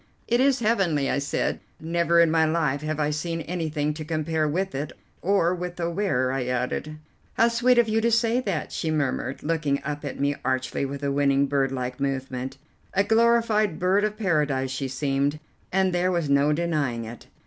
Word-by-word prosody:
"It 240 +1 +2
is 265 -1 +3
heavenly," 190 -11 +1
I - - +1
said; 140 - -1 0.2
"never 170 +1 +2
in 165 -1 +5
my 160 0 +4
life 155 -3 +1
have 155 0 -3
I 150 0 +1
seen 165 +2 -3
anything 155 -3 -2
to 155 +1 -6
compare 155 0 -1
with 190 +6 -1
it, 145 +3 -3 0.3
or 185 -2 +2
with 180 0 -5
the 170 -1 -2
wearer," 140 -9 0
I 135 -1 -1
added. 125 +5 -2 0.4
"How 230 - +4
sweet 240 +2 +3
of 240 -1 +5
you 220 +1 +1
to 235 - +2
say 230 +1 +2
that!" 195 -11 -3
she 160 - -2
murmured, 140 -3 -1
looking 150 -3 0
up 150 +1 -4
at 145 - -5
me 140 +1 +1
archly, 130 +1 -1
with 140 +1 -6
a 140 - 0
winning, 140 0 +3
bird 135 -1 0
like 125 0 -4
movement. 130 -1 -3 0.4
A 200 - +4
glorified 220 -3 +3
bird 190 +3 +2
of 215 0 -1
paradise 150 -9 0
she 135 0 -2
seemed, 140 +2 0 0.3
and 190 0 +2
there 180 +1 +2
was 170 -5 0
no 140 +1 +4
denying 150 -8 -1
it. 115 +1 -10
155 Hz, 190 wpm, -25 LUFS, 140-185 Hz, 0.4 s, in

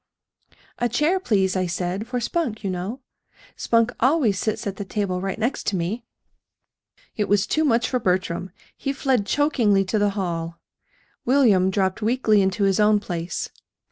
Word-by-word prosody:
"A 240 - +1
chair, 300 - +2
please, 195 - +1
I 185 -1 0
said, 180 +5 -3
for 250 -1 -2
Spunk, 240 -5 -2
you 195 - -1
know. 190 +9 -4 0.5
Spunk 230 0 +2
always 255 - +2
sits 215 +2 -2
at 195 -2 -4
the 205 - -4
table 190 -2 -2
right 195 0 -3
next 235 +5 -2
to 200 - +1
me." 190 +7 -3 1.1
It 210 - -1
was 205 0 +3
too 310 +8 +1
much 235 -5 +2
for 250 - 0
Bertram. 185 -2 -1 0.3
He 275 - -3
fled 260 -6 0
chokingly 225 -8 +2
to 210 +3 0
the 205 0 +3
hall. 170 -3 -3 0.7
William 230 -8 +4
dropped 190 +1 0
weakly 220 -2 +3
into 190 +2 0
his 195 0 +2
own 210 0 +4
place. 175 -4 -4
205 Hz, 165 wpm, -23 LUFS, 190-240 Hz, 1.1 s, William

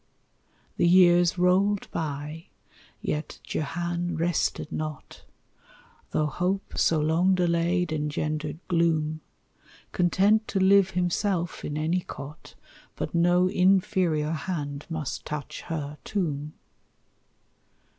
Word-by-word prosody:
The 175 - +3
years 175 -1 +5
rolled 190 +3 +2
by, 150 +1 -4 0.5
yet 150 +1 -3
Jehan 175 +3 -3
rested 165 -2 -1
not, 155 -1 -6 0.9
Tho' 155 - +1
hope, 180 +6 -2
so 160 - +3
long 165 +5 +3
delayed, 175 -1 +1
engendered 150 0 -2
gloom, 160 -3 +1 0.7
Content 200 +5 +3
to 195 - -1
live 190 0 +5
himself 180 0 -1
in 150 - -3
any 160 +4 +1
cot; 145 -3 -10 0.4
But - - -4
no 175 +1 +4
inferior 185 -4 +2
hand 145 -3 -4
must 155 -4 -4
touch 150 -2 -6
her 150 -2 -4
tomb. 150 -6 -2
170 Hz, 100 wpm, -26 LUFS, 155-180 Hz, 0.9 s, years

